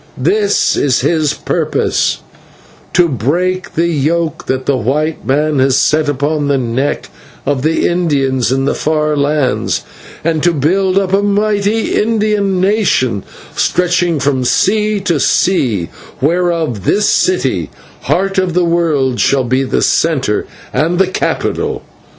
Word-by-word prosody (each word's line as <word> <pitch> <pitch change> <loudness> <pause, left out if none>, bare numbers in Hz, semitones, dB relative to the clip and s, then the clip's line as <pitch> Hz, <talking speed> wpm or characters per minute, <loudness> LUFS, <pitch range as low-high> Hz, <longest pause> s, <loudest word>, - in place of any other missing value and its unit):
"This 200 +9 +1
is 130 -3 +1
his 155 -4 +1
purpose - - -1 0.7
to 175 -1 +4
break 175 - -1
the 165 - +2
yoke 160 +1 -1
that 130 0 -2
the 140 - +1
white 145 +6 -2
man 150 +2 +1
has 130 0 +3
set 155 -1 +2
upon 145 +1 -1
the 140 -1 +2
neck 130 +3 -2 0.4
of 135 -1 0
the 160 +3 +1
Indians 135 -8 0
in 135 +1 0
the - - +1
far 155 -1 0
lands, 145 -2 0 0.4
and 160 -1 0
to 175 +1 +2
build 185 +6 +1
up 195 -1 0
a 195 - +3
mighty 205 +1 0
Indian 210 -3 0
nation 185 - +1 0.3
stretching 175 -2 +1
from 135 -1 0
sea 210 - +1
to 175 -6 0
sea, 120 - +1 0.3
whereof 165 - 0
this 205 - +2
city, 130 - +1 0.4
Heart 195 +1 +1
of 180 -2 -1
the 180 -1 +3
World, 155 -7 0
shall 135 -1 +2
be 130 +2 0
the 130 - -1
centre 135 -10 +1 0.3
and 160 +6 +1
the 190 - +4
capital. 185 - -2
155 Hz, 140 wpm, -14 LUFS, 135-185 Hz, 0.7 s, to